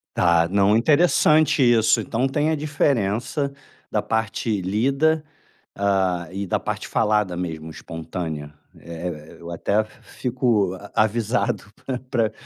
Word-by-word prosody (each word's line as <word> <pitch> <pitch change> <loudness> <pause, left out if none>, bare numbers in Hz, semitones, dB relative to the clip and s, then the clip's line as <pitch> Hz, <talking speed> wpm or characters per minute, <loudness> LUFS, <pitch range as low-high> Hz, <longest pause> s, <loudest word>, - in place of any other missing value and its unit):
Tá, 85 -1 +3
não 100 +2 +3
interessante 155 +2 +4
isso. 120 -3 +4
Então, 120 +3 -1
tem 150 +3 +1
a - - +2
diferença 140 -2 0 0.4
da - - 0
parte 110 -1 -1
lida, 135 - +1 0.5
hã, 95 -3 +1
e 100 +1 -4
da 90 - 0
parte - - -4
falada 105 -4 +1
mesmo, 80 -3 -5
espontânea. 80 -2 -6 0.2
É 85 +1 -7
é 75 -3 -8
e - - -21
eu 85 0 -8
até 100 +5 +1
fico 115 -3 -1
a 100 +2 -12
avisado 115 +1 0 0.2
pra 130 -2 -2
pra 115 -5 +1
105 Hz, 135 wpm, -23 LUFS, 90-125 Hz, 0.5 s, interessante